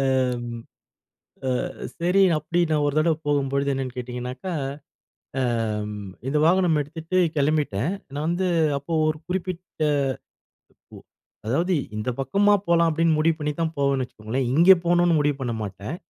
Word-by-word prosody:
அம் 125 Hz, -3 st, 0 dB, 1.1 s
அ -, -, -7 dB, 0.3 s
சரி, 180 Hz, +3 st, +3 dB
அப்பிடி 165 Hz, +3 st, 0 dB
நான் 150 Hz, -1 st, +2 dB
ஒரு 145 Hz, -, -1 dB
தடவ 160 Hz, 0 st, +2 dB
போகும்பொழுது 140 Hz, -1 st, +1 dB
என்னன்னு 130 Hz, -2 st, -4 dB
கேட்டீங்கனாக்கா 125 Hz, +7 st, -5 dB, 0.9 s
அம் 110 Hz, -4 st, -1 dB, 0.3 s
இந்த 150 Hz, +2 st, +1 dB
வாகனம் 175 Hz, -3 st, +3 dB
எடுத்துட்டு 160 Hz, +4 st, -5 dB, 0.2 s
கிளம்பிட்டேன். 145 Hz, -, +1 dB, 0.2 s
நான் 150 Hz, +2 st, -2 dB
வந்து 180 Hz, +2 st, 0 dB, 0.3 s
அப்போ 145 Hz, +4 st, -8 dB, 0.2 s
ஒரு 155 Hz, 0 st, -1 dB
குறிப்பிட்ட 180 Hz, -2 st, -4 dB, 1.1 s
உ -, -, -10 dB, 0.5 s
அதாவது 170 Hz, +10 st, +1 dB, 0.2 s
இந்த 105 Hz, +4 st, -2 dB
பக்கமா 200 Hz, +10 st, +3 dB
போலாம் 170 Hz, -1 st, +4 dB
அப்பிடின்னு 160 Hz, 0 st, +2 dB
முடிவு 160 Hz, +1 st, +3 dB
பண்ணி 150 Hz, 0 st, -1 dB
தான் 160 Hz, -1 st, -1 dB
போவேன்னு 140 Hz, -1 st, +1 dB
வச்சுக்கோங்களேன்! 120 Hz, +3 st, -3 dB
இங்கே 175 Hz, +5 st, +8 dB
போணுன்னு 175 Hz, 0 st, +3 dB
முடிவு 145 Hz, -1 st, +1 dB
பண்ண 120 Hz, -3 st, -2 dB
மாட்டேன். 100 Hz, -, -6 dB
145 Hz, 135 wpm, -24 LUFS, 125-170 Hz, 1.1 s, இங்கே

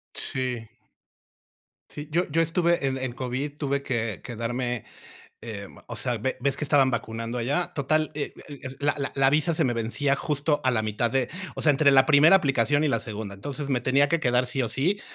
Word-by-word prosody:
Sí. 125 Hz, -4 st, -3 dB, 1.2 s
Sí, 150 Hz, 0 st, -7 dB
yo 175 Hz, +3 st, +1 dB
yo 165 Hz, +3 st, +3 dB
estuve 170 Hz, -1 st, +1 dB
en 135 Hz, -1 st, 0 dB
en 130 Hz, -2 st, -3 dB
COVID, 130 Hz, +4 st, -4 dB
tuve 140 Hz, -2 st, -1 dB
que 115 Hz, -, -2 dB
quedarme, 120 Hz, 0 st, -3 dB, 0.6 s
em, 105 Hz, -4 st, -7 dB
o -, -, -6 dB
sea, 120 Hz, +2 st, -1 dB
¿ve 130 Hz, +5 st, -2 dB
ves 140 Hz, +2 st, 0 dB
que -, -, -4 dB
estaban 140 Hz, -2 st, +4 dB
vacunando 115 Hz, +1 st, -3 dB
allá? 140 Hz, +9 st, -1 dB
Total, 155 Hz, +2 st, +1 dB
eh 150 Hz, -1 st, -4 dB
eh, 145 Hz, -2 st, -9 dB, 0.2 s
la 145 Hz, 0 st, +1 dB
la 140 Hz, -2 st, -3 dB
la 135 Hz, -1 st, +4 dB
visa 155 Hz, +4 st, +2 dB
se 160 Hz, -, +1 dB
me 120 Hz, -, +1 dB
vencía 120 Hz, +5 st, 0 dB
justo 145 Hz, 0 st, 0 dB
a 130 Hz, -, +3 dB
la 115 Hz, -3 st, +1 dB
mitad 110 Hz, +2 st, -1 dB
de 130 Hz, -2 st, +1 dB, 0.3 s
o -, -, -4 dB
sea, 150 Hz, -, +5 dB
entre 140 Hz, 0 st, +4 dB
la 135 Hz, -1 st, +6 dB
primera 155 Hz, +5 st, +7 dB
aplicación 145 Hz, -1 st, +2 dB
y 155 Hz, -, +3 dB
la 135 Hz, -, +1 dB
segunda. 105 Hz, -3 st, -6 dB
Entonces, 140 Hz, +7 st, -5 dB
me 125 Hz, -3 st, +1 dB
tenía 140 Hz, +2 st, +3 dB
que 165 Hz, +4 st, +1 dB
quedar 125 Hz, -3 st, +2 dB
sí 130 Hz, +2 st, -2 dB
o 120 Hz, -, -1 dB
sí 180 Hz, -, 0 dB
135 Hz, 205 wpm, -26 LUFS, 120-145 Hz, 1.2 s, primera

